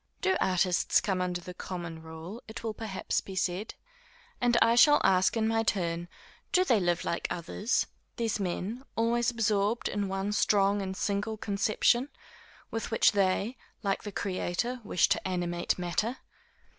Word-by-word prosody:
_ - - -38
Do 380 0 +2
artists 180 -1 +3
come 190 -3 -1
under 180 -1 -2
the 180 +1 -8
common 170 -3 -6
rule, 160 +7 -9
it 220 +1 -8
will 225 -1 -2
perhaps 215 -3 -2
be 190 - -9
said? 185 +3 -2 0.7
and 240 -1 +3
I 230 +1 +5
shall 295 +5 +7
ask, 185 +3 +3
in 220 0 +2
my 225 0 +2
turn: 175 -5 -1 0.4
Do 365 - +4
they 240 - +4
live 175 -2 0
like 170 - -1
others, 185 +7 -1 0.3
these 225 -3 -1
men, 200 +6 -3
always 235 +1 +2
absorbed 220 -1 +1
in 205 -1 -1
one 195 +1 -2
strong 200 -1 +3
and 190 -1 -4
single 210 +2 -1
conception, 215 +5 +1 0.6
with 225 - -3
which 225 - +4
they, 200 +4 +1 0.3
like 195 -1 0
the 205 - -6
Creator, 200 +6 -2
wish 180 - +3
to - - 0
animate 175 -1 -1
matter? 185 +8 -1
200 Hz, 160 wpm, -29 LUFS, 180-225 Hz, 0.7 s, shall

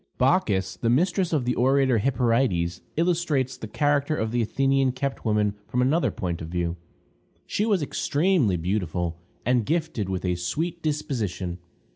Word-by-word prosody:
Bacchis, 105 - +2
the 115 - 0
mistress 180 +7 +2
of 145 -6 +1
the 125 - +1
orator 130 -1 +3
Hyperides, 115 -8 +1 0.2
illustrates 160 -6 +1
the 110 - -7
character 145 +4 +1
of 110 -5 -2
the 120 0 +1
Athenian 135 +3 +2
kept 135 +1 -3
woman 105 -2 +1
from 125 - -2
another 140 +7 +3
point 85 -3 -4
of 80 - -5
view. 85 -1 -1 0.7
She 210 - -1
was 200 -8 +2
extremely 145 - +1
beautiful, 85 -2 -2 0.3
and 125 -1 +3
gifted 155 - -1
with 95 0 -2
a 90 - +1
sweet 155 - -3
disposition. 110 - -2
125 Hz, 150 wpm, -25 LUFS, 95-150 Hz, 0.7 s, orator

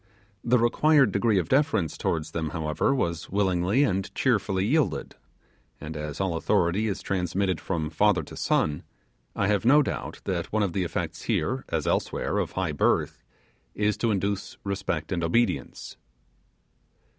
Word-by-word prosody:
The 125 +1 +3
required 135 +2 +4
degree 105 +1 +2
of 90 -4 0
deference 135 - +1
towards 80 -2 -2
them, 80 -2 -2
however, 80 - 0
was 85 -11 -1
willingly 95 +5 +2
and 95 -5 -1
cheerfully 100 -6 +1
yielded; 145 +4 0 0.7
and 80 +1 -7
as 75 -1 -5
all 95 -3 0
authority 85 +6 +1
is 100 - -3
transmitted 95 -1 -1
from 80 -5 -2
father 100 +4 +2
to - - -11
son, 75 -1 0 0.5
I 100 - +1
have 105 0 +1
no 145 +5 +6
doubt - - -5
that - - -3
one 110 -1 +1
of 95 -4 -1
the 95 - 0
effects 85 - -4
here, - - -1
as - - -1
elsewhere, - - 0
of - - -2
high 95 -4 -1
birth, 75 - +1 0.5
is 105 0 +1
to 115 - 0
induce 100 -1 -2
respect 95 -5 -3
and 85 -2 -1
obedience. 115 +9 -1
95 Hz, 155 wpm, -26 LUFS, 85-110 Hz, 0.7 s, no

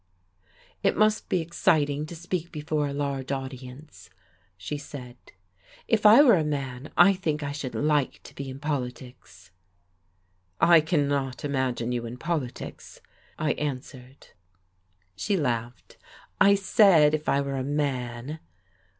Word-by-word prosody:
"It - - +1
must 215 +1 +2
be 180 - +1
exciting 150 -3 +1
to 170 - -8
speak 175 0 -4
before 150 -2 -2
a - - -4
large 140 -2 -3
audience," 130 - -8 0.5
she 95 +10 -5
said. 135 -4 -9 0.7
"If 215 -2 +4
I 225 +7 +9
were 240 -9 +6
a - - 0
man, 140 -2 -4
I 175 +3 +7
think 155 -5 -2
I 145 - -3
should 145 -3 -5
like 150 -2 0
to - - -13
be 140 -1 -7
in 130 - -7
politics." 125 - -6 1.1
"I 170 -1 +6
cannot 145 -5 -1
imagine 130 -4 -1
you 120 -1 -3
in 120 +2 -8
politics," 155 -5 -5 0.4
I 155 -1 0
answered. 130 -2 -7 0.9
She 190 - -1
laughed. 120 - -3 0.4
"I 200 0 +6
said, 190 -6 +5
if 155 0 -1
I 140 - +3
were 140 -1 -2
a 130 - -2
man." 135 -1 -3
145 Hz, 135 wpm, -26 LUFS, 130-155 Hz, 1.1 s, I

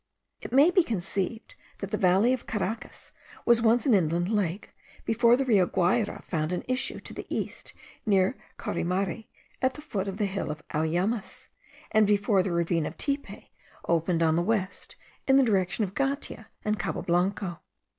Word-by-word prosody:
It - - -7
may 285 +7 +6
be 365 - +5
conceived 200 - -3 0.2
that 195 0 -6
the - - +1
valley 190 +7 +4
of 260 - -4
Caracas 220 +2 -4 0.3
was 235 -1 +5
once 230 +1 +3
an 265 - +4
inland 175 -1 +2
lake, 205 -3 -1 0.3
before 235 +1 +4
the 270 - 0
Rio 200 -8 +4
Guayra 195 +4 0
found 155 -2 -2
an 180 - -2
issue 255 0 0
to - - -7
the - - -7
east - - -4 0.3
near 195 +2 +2 0.2
Caurimare, 190 +4 -2 0.3
at 260 0 +1
the - - -8
foot 205 -10 -3
of 195 0 -4
the 210 - +1
hill 195 0 -3
of 155 0 -7
Auyamas, 175 +8 -1 0.4
and 215 -1 +4
before 205 -1 +3
the 185 0 -2
ravine 170 -2 +1
of - - -8
Tipe 280 0 -3 0.4
opened 170 0 +2
on 160 -1 +3
the 170 - +2
west, 200 0 -2 0.3
in 270 0 +6
the 275 - +6
direction 195 -1 +1
of 195 -2 -3
Gatia 275 +3 -2 0.2
and 210 -2 0
Cabo 180 - -3
Blanco. 180 0 0
200 Hz, 175 wpm, -27 LUFS, 180-235 Hz, 0.4 s, may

